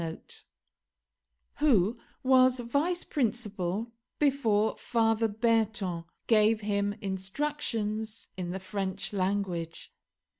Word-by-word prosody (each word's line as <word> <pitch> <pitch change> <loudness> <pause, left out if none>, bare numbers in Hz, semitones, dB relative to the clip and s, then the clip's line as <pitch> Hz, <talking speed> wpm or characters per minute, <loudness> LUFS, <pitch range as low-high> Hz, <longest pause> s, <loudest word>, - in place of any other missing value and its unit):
] - - -54
who 235 -8 +4 0.3
was 255 -1 +5
vice 285 +9 0
principal 220 - -2 0.3
before 230 -7 +2
Father 225 -1 +1
Berton, 215 -5 0 0.2
gave 220 -1 +4
him 205 -1 0
instructions 215 +1 -2
in 180 -2 -4
the 190 +2 -3
French 190 +1 -3
language. 185 -4 -2
215 Hz, 85 wpm, -29 LUFS, 195-240 Hz, 0.3 s, was